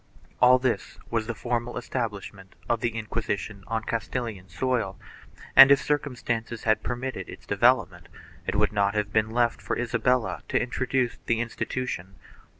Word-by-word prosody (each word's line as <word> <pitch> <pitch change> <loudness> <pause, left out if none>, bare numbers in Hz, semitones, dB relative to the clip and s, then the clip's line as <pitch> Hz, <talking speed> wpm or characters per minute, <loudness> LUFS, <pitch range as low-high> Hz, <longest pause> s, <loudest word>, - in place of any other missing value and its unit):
1 125 - +7
All 130 - +8
this 130 -2 -2
was 115 -1 0
the 120 - -3
formal 120 +1 -2
establishment 105 -6 -5
of 120 - +1
the 115 -1 -1
Inquisition 105 -2 -3
on 110 0 -2
Castilian 115 -4 -4
soil 110 -2 -1 0.6
and, 135 0 +11
if 140 0 +7
circumstances 120 -5 -2
had 110 -1 +2
per 125 - -2
mitted 125 -6 -5
its - - -11
development, - - +2 0.4
it - - -1
would - - +2
not 100 0 +1
have 105 -1 -1
been 110 0 +2
left 120 +1 +1
for - - -2
Isabella 125 0 0
to - - +2
introduce 125 0 -1
the 115 -1 +2
institution. 115 -5 -3
115 Hz, 155 wpm, -26 LUFS, 110-125 Hz, 0.6 s, and